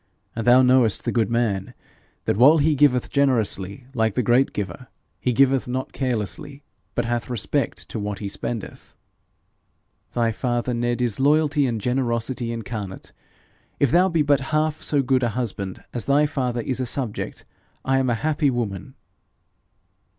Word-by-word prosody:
And 115 0 -3
thou 125 +2 +7
knowest 125 -4 +3
the - - 0
good 115 -4 +1
man, 110 -5 -1 0.5
that - - +1
while 135 +9 +7
he 155 +1 +3
giveth 135 -3 +2
generously 120 -5 0
like 110 -4 0
the 125 - +1
great 120 +4 +3
Giver, 105 +5 -5 0.3
he 125 - 0
giveth 135 +1 +3
not 130 +1 -3
carelessly, 135 +3 -3 0.3
but 120 - 0
hath 120 +1 -2
respect 120 - -1
to 110 - -4
what 105 -1 -3
he 100 - -5
spendeth.' 110 +2 -6 1.2
'Thy 115 -1 +1
father, 120 +1 -1
Ned, 120 +1 -1
is 120 -2 -1
loyalty 145 0 +3
and 115 -3 -2
generosity 120 0 -1
incarnate. 105 -4 -6 0.7
If 140 -4 +3
thou 185 +2 +4
be 165 -3 +2
but 145 -2 +3
half 155 0 0
so 145 -2 +1
good 130 0 +2
a 120 - +1
husband 100 -6 -4
as 120 - -3
thy 145 +2 +4
father 125 -5 -2
is 130 +2 -3
a 130 - -1
subject, 120 -4 -4 0.4
I 135 0 +2
am 130 -1 +1
a 120 - +2
happy 150 -2 +2
woman.' 110 -7 -4
125 Hz, 160 wpm, -23 LUFS, 115-135 Hz, 1.2 s, thou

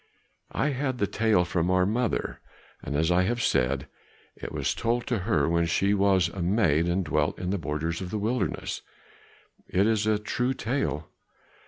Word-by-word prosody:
I 150 - 0
had 130 -2 -2
the 105 - +1
tale 105 -3 +2
from 85 0 0
our 90 0 +3
mother. 115 +3 -1 0.4
As 80 +4 0
I 90 +1 +4
have 120 +6 0
said, 65 - +1 0.5
it - - -7
was - - -1
told 120 +1 -1
to 120 -4 -1
her 90 -7 +1
when 85 0 +2
she 100 +4 +2
was 95 -3 +3
a 95 +2 -6
maid 85 -4 +2
and 90 +2 0
dwelt - - 0
in 90 0 -3
the 100 - -1
borders 80 +3 -2
of 90 - -5
the 110 - -2
wilderness; 110 0 -2 0.9
it 95 +2 +2
is 110 -1 +1
a 110 -1 +3
true 125 +5 -1
tale. 110 - -2
95 Hz, 175 wpm, -27 LUFS, 85-115 Hz, 0.9 s, I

